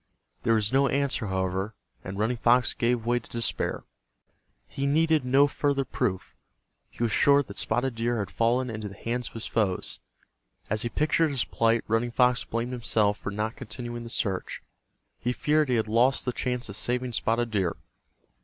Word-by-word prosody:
There 115 Hz, -, +3 dB
was 110 Hz, +2 st, +1 dB
no 135 Hz, +1 st, +4 dB
answer, 135 Hz, -5 st, 0 dB
however, 95 Hz, +2 st, -2 dB, 0.3 s
and 95 Hz, +1 st, -6 dB
Running 110 Hz, +4 st, 0 dB
Fox 120 Hz, +2 st, +3 dB
gave 120 Hz, -1 st, 0 dB
way 120 Hz, +1 st, +2 dB
to 115 Hz, -, -18 dB
despair. 115 Hz, -1 st, -2 dB, 0.8 s
He 140 Hz, 0 st, -2 dB
needed 160 Hz, 0 st, +3 dB
no 135 Hz, +3 st, +5 dB
further 140 Hz, -1 st, 0 dB
proof. 110 Hz, -7 st, -2 dB, 0.5 s
He -, -, -5 dB
was 115 Hz, -, +1 dB
sure 140 Hz, +4 st, +5 dB
that 100 Hz, -6 st, -11 dB
Spotted 125 Hz, +3 st, 0 dB
Deer 120 Hz, +1 st, -1 dB
had 100 Hz, -3 st, -3 dB
fallen 120 Hz, +2 st, +1 dB
into 110 Hz, -1 st, -5 dB
the 100 Hz, -, -11 dB
hands 120 Hz, +1 st, -2 dB
of -, -, -12 dB
his 115 Hz, -, -2 dB
foes. 100 Hz, -5 st, 0 dB, 0.7 s
As 110 Hz, 0 st, +2 dB
he 120 Hz, -, -1 dB
pictured 155 Hz, +4 st, +2 dB
his 135 Hz, -4 st, 0 dB
plight, 115 Hz, 0 st, +1 dB
Running 115 Hz, +2 st, +1 dB
Fox 125 Hz, +1 st, +3 dB
blamed 115 Hz, +2 st, -3 dB
himself 110 Hz, -4 st, +1 dB
for -, -, -4 dB
not 105 Hz, +2 st, -3 dB
continuing 120 Hz, +2 st, -6 dB
the 115 Hz, -, -8 dB
search. 100 Hz, -5 st, -3 dB, 0.6 s
He 125 Hz, +1 st, -1 dB
feared 150 Hz, +1 st, +2 dB
he 125 Hz, -, +3 dB
had 110 Hz, -1 st, +1 dB
lost 120 Hz, +5 st, +3 dB
the 125 Hz, -, 0 dB
chance 125 Hz, -1 st, -2 dB
of 100 Hz, -, -7 dB
saving 125 Hz, +2 st, -2 dB
Spotted 115 Hz, +1 st, 0 dB
Deer. 95 Hz, -5 st, 0 dB
120 Hz, 180 wpm, -27 LUFS, 110-125 Hz, 0.8 s, no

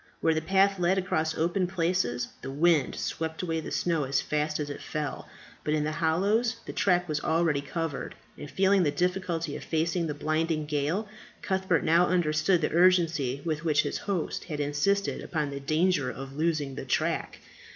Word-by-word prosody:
Where 160 Hz, -, +3 dB
the 160 Hz, -, 0 dB
path 195 Hz, +3 st, +3 dB
led 180 Hz, +2 st, +2 dB
across 160 Hz, -4 st, 0 dB
open 175 Hz, +3 st, +1 dB
places 170 Hz, -9 st, 0 dB
the -, -, -6 dB
wind 150 Hz, +1 st, +2 dB
swept 160 Hz, +1 st, -3 dB
away 165 Hz, -2 st, -1 dB
the 160 Hz, -, -6 dB
snow 165 Hz, -5 st, 0 dB
as 135 Hz, +1 st, +1 dB
fast 150 Hz, 0 st, -1 dB
as 150 Hz, -, -2 dB
it 145 Hz, -, -7 dB
fell, 150 Hz, -2 st, -4 dB, 0.3 s
but 150 Hz, -, +1 dB
in 150 Hz, -, 0 dB
the 155 Hz, -, -1 dB
hollows 200 Hz, +9 st, +1 dB
the -, -, -6 dB
track 180 Hz, -3 st, +2 dB
was 155 Hz, -2 st, -2 dB
already 160 Hz, -3 st, +1 dB
covered; 145 Hz, +1 st, -4 dB, 0.2 s
and 145 Hz, -, -9 dB
feeling 190 Hz, +6 st, +3 dB
the 160 Hz, -, +3 dB
difficulty 175 Hz, -1 st, -1 dB
of -, -, -7 dB
facing 165 Hz, +1 st, 0 dB
the 150 Hz, -, -3 dB
blinding 155 Hz, +1 st, 0 dB
gale, 150 Hz, +8 st, -1 dB, 0.4 s
Cuthbert 190 Hz, -3 st, +1 dB
now 170 Hz, +2 st, +4 dB
understood 170 Hz, 0 st, +2 dB
the 150 Hz, -, -1 dB
urgency 165 Hz, -7 st, +3 dB
with 155 Hz, -1 st, -2 dB
which 150 Hz, -3 st, +3 dB
his -, -, -3 dB
host 190 Hz, -5 st, -3 dB
had 150 Hz, -3 st, -5 dB
insisted 145 Hz, +8 st, 0 dB
upon 150 Hz, -4 st, -2 dB
the 140 Hz, -, -5 dB
danger 155 Hz, 0 st, +1 dB
of 135 Hz, +2 st, -8 dB
losing 155 Hz, -3 st, 0 dB
the -, -, -6 dB
track. -, -, -1 dB
160 Hz, 180 wpm, -28 LUFS, 150-180 Hz, 0.4 s, now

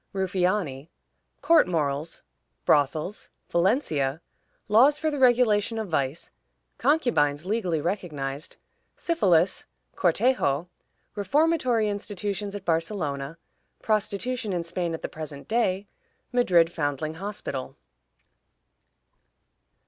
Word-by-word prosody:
Ruffiani. 180 Hz, -6 st, -1 dB, 0.5 s
Court 330 Hz, -, +5 dB
Morals. 155 Hz, -2 st, -2 dB, 0.4 s
Brothels. 155 Hz, +7 st, +1 dB, 0.2 s
Valencia. 170 Hz, -, +1 dB, 0.5 s
Laws 255 Hz, +8 st, +5 dB
for 310 Hz, 0 st, -1 dB
the 290 Hz, -, -3 dB
Regulation 235 Hz, -4 st, +3 dB
of 220 Hz, -3 st, -3 dB
Vice. 140 Hz, 0 st, -2 dB, 0.5 s
Concubines 160 Hz, -, +2 dB
legally 185 Hz, -6 st, 0 dB
recognized. 150 Hz, -6 st, -4 dB, 0.4 s
Syphilis. 190 Hz, -, +2 dB, 0.3 s
Cortejo. 175 Hz, -, +1 dB, 0.4 s
Reformatory 245 Hz, -, +2 dB
Institutions 205 Hz, -1 st, -3 dB
at 200 Hz, -2 st, -7 dB
Barcelona. 160 Hz, -4 st, -2 dB, 0.5 s
Prostitution 215 Hz, +1 st, -1 dB
in 175 Hz, -1 st, -1 dB
Spain 170 Hz, 0 st, -2 dB
at -, -, -10 dB
the -, -, -1 dB
Present 150 Hz, -3 st, -8 dB
Day. 205 Hz, -4 st, +1 dB, 0.5 s
Madrid 180 Hz, -9 st, +4 dB
Foundling 150 Hz, -1 st, -2 dB
Hospital. 140 Hz, -10 st, -5 dB
185 Hz, 90 wpm, -26 LUFS, 155-220 Hz, 0.5 s, Court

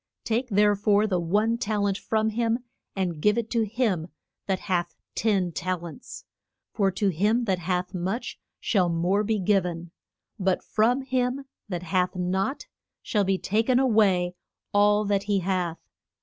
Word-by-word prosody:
Take 235 Hz, +3 st, 0 dB
there 205 Hz, 0 st, +4 dB
fore 205 Hz, +1 st, +3 dB
the 185 Hz, -4 st, 0 dB
one 210 Hz, +7 st, +1 dB
tal 210 Hz, -2 st, 0 dB
ent 200 Hz, -1 st, +1 dB
from 220 Hz, +2 st, 0 dB
him 230 Hz, +2 st, 0 dB, 0.3 s
and 175 Hz, -5 st, -2 dB
give 210 Hz, +5 st, +3 dB
it 230 Hz, -1 st, -2 dB
to 235 Hz, -, +2 dB
him 205 Hz, -8 st, 0 dB, 0.4 s
that 190 Hz, -1 st, 0 dB
hath 175 Hz, -2 st, -1 dB, 0.2 s
ten 195 Hz, -5 st, +1 dB
tal 180 Hz, +1 st, -3 dB
ents. 170 Hz, +9 st, -10 dB, 0.5 s
For 200 Hz, -4 st, +2 dB
to 195 Hz, +2 st, 0 dB
him 210 Hz, +8 st, +1 dB
that 190 Hz, -4 st, 0 dB
hath 180 Hz, +1 st, -2 dB
much 190 Hz, +7 st, -3 dB, 0.2 s
shall 185 Hz, -5 st, +2 dB
more 175 Hz, +5 st, +1 dB
be 220 Hz, +1 st, 0 dB
giv 195 Hz, 0 st, +2 dB
en; 170 Hz, -1 st, -5 dB, 0.5 s
but 190 Hz, -1 st, +1 dB
from 245 Hz, +5 st, +1 dB
him 260 Hz, +1 st, -1 dB, 0.2 s
that 180 Hz, -2 st, -3 dB
hath 180 Hz, +2 st, 0 dB
not, 190 Hz, +8 st, -1 dB, 0.4 s
shall 210 Hz, -3 st, +1 dB
be 195 Hz, 0 st, +1 dB
ta 210 Hz, +4 st, +1 dB
ken 245 Hz, +2 st, +2 dB
a 265 Hz, -, +3 dB
way 195 Hz, -7 st, +3 dB, 0.4 s
all 205 Hz, +1 st, +4 dB
that 200 Hz, -1 st, 0 dB
he 200 Hz, -2 st, +1 dB
hath. 180 Hz, -2 st, -1 dB
200 Hz, 170 wpm, -26 LUFS, 180-220 Hz, 0.5 s, there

